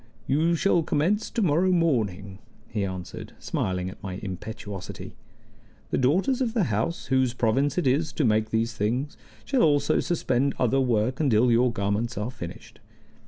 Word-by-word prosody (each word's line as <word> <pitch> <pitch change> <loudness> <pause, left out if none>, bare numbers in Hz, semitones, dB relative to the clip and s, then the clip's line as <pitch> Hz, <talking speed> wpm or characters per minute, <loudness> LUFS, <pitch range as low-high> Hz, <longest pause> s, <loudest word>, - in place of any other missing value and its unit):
"You 160 +5 +2
shall 175 0 +3
commence 170 +7 0
to 230 - -1
morrow 175 +3 +3
morning," 105 - 0 0.3
he 105 -3 -2
answered, 95 -2 -6
smiling 90 -1 -2
at 95 - -9
my 95 -1 -5
impetuosity. 105 0 -7 0.8
"The - - +1
daughters 190 - +2
of 235 -2 -1
the 220 - +3
house, 115 +12 -1
whose 130 -2 +2
province 130 +7 +1
it 180 - +1
is 150 +4 +2
to 150 - 0
make 110 -1 +2
these 115 +1 0
things, 120 +7 -1 0.3
shall 270 -3 +1
also 145 -2 +3
suspend 140 -5 0
other 130 +2 +2
work 125 0 +1
until 125 -5 +3
your 120 +1 +4
garments 105 +2 -1
are 105 +4 -2
finished. 85 -8 -9
125 Hz, 160 wpm, -26 LUFS, 105-155 Hz, 0.8 s, your